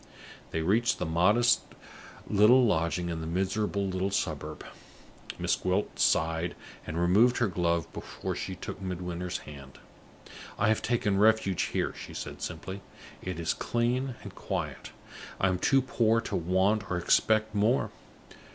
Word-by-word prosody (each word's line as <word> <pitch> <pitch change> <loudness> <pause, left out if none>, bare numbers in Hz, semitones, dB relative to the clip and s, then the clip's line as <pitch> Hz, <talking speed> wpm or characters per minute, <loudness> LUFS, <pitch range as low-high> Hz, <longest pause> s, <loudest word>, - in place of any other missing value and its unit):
They 80 - -2
reached 110 +7 +2
the - - -2
modest 95 +9 +4 0.7
little 110 +5 +5
lodging 85 -3 0
in 80 -1 -3
the 80 - -5
miserable 100 +3 -1
little 95 0 -1
suburb. 75 -6 -3 0.7
Miss - - +1
Gwilt 95 +3 -1
sighed, 80 +2 +1 0.3
and 80 - -4
removed 105 +8 +4
her 120 - +2
glove 85 -3 0
before - - -5
she 95 - -4
took 90 - -7
Midwinter's 90 -1 -4
hand. 70 -3 -11 0.8
"I 100 - +2
have 110 - +2
taken 110 -5 +1
refuge 110 -3 +3
here," - - -1
she - - -9
said, - - -6
simply. 95 +2 -6 0.4
"It 90 -2 -5
is 85 - 0
clean 120 +2 -1
and - - -9
quiet; - - -4 0.5
I 95 - +3
am 90 -1 -1
too 135 +7 +3
poor 115 -3 +2
to - - -4
want 95 +4 +1
or 90 - 0
expect 110 +5 +2
more. 110 +5 +2
95 Hz, 145 wpm, -29 LUFS, 85-110 Hz, 0.8 s, little